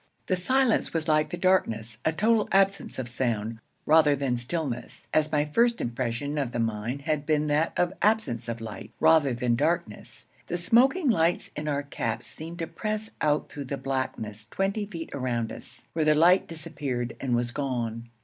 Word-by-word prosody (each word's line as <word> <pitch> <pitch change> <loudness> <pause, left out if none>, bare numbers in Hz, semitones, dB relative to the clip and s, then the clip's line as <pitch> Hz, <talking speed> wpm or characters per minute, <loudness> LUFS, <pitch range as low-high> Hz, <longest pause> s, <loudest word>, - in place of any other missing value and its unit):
The 185 - +1
silence 255 +2 +2
was 160 0 -1
like 155 -1 +3
the 175 - -4
darkness 115 - +1
a 160 - +2
total 215 +5 +2
absence 195 0 +2
of 130 - -3
sound, 115 -3 -2 0.3
rather 155 -2 +5
than 135 -3 0
stillness, 120 -2 -4
as 155 0 +2
my 150 -1 +2
first 235 +10 +2
impression 120 +5 -2
of 130 -4 -2
the 120 - -2
mine 115 +4 -2
had 155 -2 0
been 155 -1 +2
that 150 +3 +2
of 175 0 +2
an - - -15
absence 200 - +1
of 115 0 -4
light, 110 -2 -7
rather 155 -4 +5
than 120 0 0
of 120 - +2
darkness. 155 -6 -2 0.2
The 175 - -2
smoking 255 - +4
lights 170 -3 +1
in 150 +1 -4
our 145 -1 0
caps 140 - -3
seemed 165 +2 -8
to 165 - -2
press 215 +6 -2
out 150 0 +1
through 145 -1 -6
the 140 +2 -4
blackness 110 -6 -3
twenty 200 +2 -1
feet 165 -5 -7
around 120 -4 -2
us, - - -11
where 160 - +1
the 155 0 +4
light 175 +5 +5
disappeared 140 -7 -4
and 125 -3 0
was 120 0 0
gone. 120 -4 -3
150 Hz, 190 wpm, -27 LUFS, 120-175 Hz, 0.3 s, rather